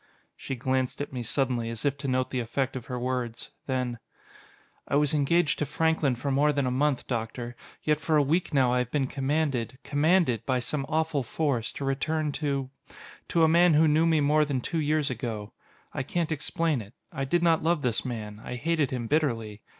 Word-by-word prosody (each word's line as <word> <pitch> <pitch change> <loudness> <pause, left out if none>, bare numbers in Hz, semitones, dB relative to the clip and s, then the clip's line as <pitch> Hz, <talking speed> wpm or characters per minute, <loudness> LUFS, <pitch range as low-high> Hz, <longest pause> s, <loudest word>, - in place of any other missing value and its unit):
She 135 - -5
glanced 130 +1 -1
at 145 -1 -4
me 125 - -3
suddenly, 120 -1 0
as 115 +1 -5
if 140 -1 +2
to 140 - -4
note 130 0 0
the 130 - -1
effect 130 +3 -2
of 120 -2 -6
her 125 -1 -3
words. 125 -2 -3 0.2
Then: 125 -3 -1 0.9
"I - - 0
was 150 +1 +3
engaged 150 +2 +2
to 150 - +1
Franklin 160 -3 +1
for 135 +4 -3
more 145 +3 +3
than 140 -2 0
a 125 - 0
month, 140 +1 +1
Doctor: 120 0 -4 0.3
yet 150 -1 +2
for 160 0 +2
a 145 - +5
week 160 +6 0
now 130 -4 +3
I 125 - +2
have 125 -1 -1
been 140 0 +1
commanded 135 -3 -1
commanded 145 - +2
by 130 -1 +1
some 135 +3 -2
awful 160 -2 +1
force, 125 -2 -1
to 140 - -5
return 150 +3 0
to 140 -3 -2 0.6
to 165 - +2
a - - +7
man 170 0 +5
who 160 +1 +5
knew 155 +2 +4
me 160 -2 +3
more 150 +2 +4
than 140 -3 -1
two 165 +6 -2
years 150 -1 +1
ago. 110 -5 -5 0.4
I - - -2
can't 165 +4 -2
explain 155 -1 0
it. 105 +2 -13 0.2
I 135 - -3
did 170 +6 +1
not 165 -2 +4
love 165 -1 +1
this 120 -3 0
man; 110 -4 -6
I - - -5
hated 155 +1 0
him 125 -2 -3
bitterly. 115 -7 0
135 Hz, 205 wpm, -27 LUFS, 125-155 Hz, 0.9 s, a